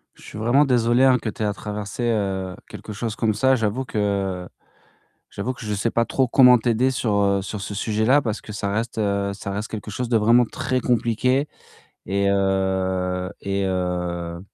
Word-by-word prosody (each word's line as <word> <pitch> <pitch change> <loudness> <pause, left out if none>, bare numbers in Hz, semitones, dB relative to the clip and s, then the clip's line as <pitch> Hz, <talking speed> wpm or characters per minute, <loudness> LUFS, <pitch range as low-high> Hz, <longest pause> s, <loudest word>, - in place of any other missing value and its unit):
Je - - -19
suis - - -9
vraiment 120 +7 +3
désolé, 120 -1 +2
hein 130 -1 +5
que 115 - -5
tu 110 - -5
aies - - +1
à 105 - 0
traverser 105 +2 -5 0.6
quelque 105 - -9
chose 110 +1 -4
comme 110 -2 +1
ça. 130 +5 +3
J'avoue 115 +3 -1
que 100 -5 -2 0.8
j'avoue 130 - -3
que 115 - -10
je 105 - -2
sais 105 +3 0
pas 115 +1 +1
trop 130 +2 +1
comment 125 0 +6
t'aider 120 +3 +1
sur, 115 -5 -1
heu, 100 0 +2
sur 105 +2 -6
ce 100 +1 -5
sujet-là 110 +7 +2
parce 110 -4 -3
que 105 - -11
ça 100 -1 -3
reste, 115 +2 -2
heu, 100 -1 0
ça 100 0 -7
reste 105 +3 -3
quelque 110 -1 -6
chose 120 +3 -4
de 115 - +4
vraiment 115 +3 +4
très 130 +3 -2
compliqué 125 +3 +1 0.6
et 100 0 +1
heu 95 -1 0
et 100 0 -1
heu 90 -2 -2
105 Hz, 190 wpm, -23 LUFS, 100-120 Hz, 0.8 s, comment